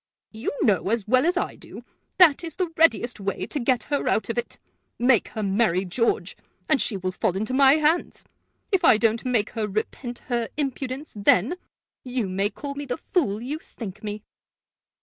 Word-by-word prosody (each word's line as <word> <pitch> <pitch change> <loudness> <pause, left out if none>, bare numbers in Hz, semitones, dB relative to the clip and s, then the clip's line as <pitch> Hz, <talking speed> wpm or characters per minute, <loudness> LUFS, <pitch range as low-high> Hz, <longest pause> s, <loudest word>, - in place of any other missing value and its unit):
"You 220 +1 -4
know, 195 -3 +2
as 225 -2 -1
well 255 +6 +3
as 355 +1 +1
I - - -2
do, - - -12 0.3
that 345 -4 +6
is 330 -3 -6
the 360 -3 -2
readiest 245 -7 +3
way 200 0 -3
to 295 - -3
get 250 0 +1
her 285 -1 -2
out - - +1
of - - -3
it. 485 - -6 0.4
Make 245 -3 +3
her 215 - -5
marry 195 -2 +1
George, 230 +6 -1 0.3
and 305 -4 +3
she 205 - -2
will 185 0 -3
fall 185 0 -1
into 220 +5 -2
my 270 0 +6
hands. 310 +3 +1 0.5
If 385 -3 +2
I - - +7
don't 225 0 +1
make 240 -5 0
her 220 -3 -2
repent 235 +4 -4
her 235 -2 -1
impudence 275 0 -4
then, 205 - +3 0.5
you 250 -4 -2
may 195 +2 0
call 280 +5 -7
me 285 +1 -6
the 250 -2 -3
fool 230 - -1
you 290 +5 -4
think 215 - -9
me." 210 0 -5
240 Hz, 190 wpm, -24 LUFS, 210-280 Hz, 0.5 s, I